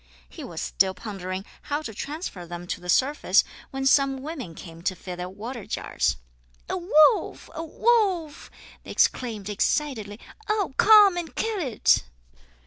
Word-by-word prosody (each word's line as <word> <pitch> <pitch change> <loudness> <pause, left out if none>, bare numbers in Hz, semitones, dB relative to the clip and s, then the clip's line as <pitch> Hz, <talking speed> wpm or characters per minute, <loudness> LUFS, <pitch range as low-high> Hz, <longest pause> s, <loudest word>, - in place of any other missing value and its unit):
He - - -10
was - - -6
still 190 0 +1
pondering 190 -2 -6 0.2
how 295 +2 -3
to 225 - -6
transfer 280 - -6
them 175 +1 -7
to 175 - -4
the 180 - -9
surface 280 - +3 0.3
when 270 0 -4
some 270 -1 +3
women 275 - -6
came 165 -1 -11
to 185 +1 -1
fill 180 0 -7
their 180 +1 -5
water 225 +4 -7
jars. - - -1 0.5
"A - - -2
wolf! 350 +3 +3
a 325 0 -5
wolf!" 370 -4 +1 0.3
they - - -14
exclaimed 220 -6 0
excitedly. 215 -1 -1 0.3
"Oh, 415 -8 0
come 415 -4 +7
and 340 -2 -5
kill 445 -2 -1
it!" 260 -10 +3
265 Hz, 150 wpm, -25 LUFS, -, 0.5 s, come